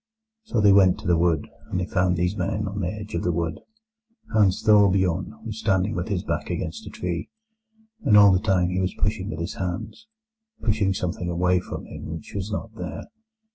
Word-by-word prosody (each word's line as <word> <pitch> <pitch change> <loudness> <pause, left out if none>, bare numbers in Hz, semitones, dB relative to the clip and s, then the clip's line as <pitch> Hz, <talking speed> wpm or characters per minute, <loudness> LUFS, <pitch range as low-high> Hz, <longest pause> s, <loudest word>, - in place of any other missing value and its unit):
"So 120 - -1
they 100 -1 +6
went 95 -2 +5
to - - -13
the 90 - +4
wood, 85 -2 +1 0.2
and 95 - -1
they 90 - -1
found 90 -1 +1
these 90 +3 0
men 105 0 -1
on 100 +1 -4
the 85 - -1
edge 105 +2 -6
of 85 - -1
the 90 - +1
wood. 85 -1 -2 0.7
Hans 100 -4 +3
Thorbjorn 100 0 +3
was 110 -1 -5
standing 100 0 +1
with 90 -3 -3
his 100 -5 -1
back - - -3
against - - -4
a - - -5
tree, 85 -1 -4 0.7
and 105 -5 +5
all 100 -1 +8
the 90 - +4
time 90 -3 +2
he 90 +1 -1
was 90 0 -1
pushing 105 -1 -1
with 80 - -5
his 85 +2 -3
hands—pushing 215 - -3
something 90 -1 -3
away 90 +1 +2
from - - -7
him - - -8
which 80 0 -7
was 100 +1 -4
not 110 +2 -4
there. 110 - -7
95 Hz, 200 wpm, -24 LUFS, 90-105 Hz, 0.7 s, all